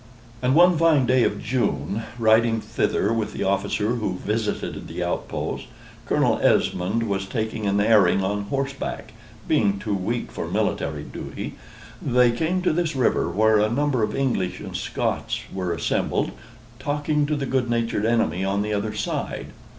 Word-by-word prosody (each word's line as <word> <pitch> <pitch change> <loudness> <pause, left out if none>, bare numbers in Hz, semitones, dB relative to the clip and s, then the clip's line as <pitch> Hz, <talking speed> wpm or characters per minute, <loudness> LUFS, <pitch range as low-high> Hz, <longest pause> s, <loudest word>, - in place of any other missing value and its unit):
And 130 +2 +2
one 175 0 +6
fine 160 -5 +4
day 130 0 +4
of - - -1
June, 120 -4 -1 0.2
riding 115 0 +4
thither 105 0 0
with 115 -2 -2
the - - -3
officer 100 +4 0
who 105 -5 -2
visited 105 +2 -3
the - - -4
outposts, - - -3 0.4
(Colonel - - +2
Esmond 95 +6 +2
was 95 -1 -2
taking 110 -1 -2
an 100 +1 +2
airing 100 -3 +4
on 100 +1 -1
horseback, 135 -2 -4 0.3
being 105 -10 +2
too 105 +1 -3
weak 100 +5 -2
for - - -4
military - - -1
duty,) - - -6 0.5
they 125 -2 +4
came 165 +9 -1
to 180 - +2
this 165 -2 0
river, 125 -8 +2
where 110 +4 +3
a 105 +1 +3
number 135 +1 +1
of 105 - 0
English 125 -10 0
and - - -7
Scots - - -2
were 90 -2 -2
assembled, 85 - 0 0.5
talking 145 +2 0
to 150 - 0
the 140 -1 -2
good 130 -2 0
natured 115 -3 0
enemy 115 -5 +1
on 100 +1 0
the 105 0 -2
other 105 +1 -2
side. 105 - -3
115 Hz, 160 wpm, -24 LUFS, 100-130 Hz, 0.5 s, one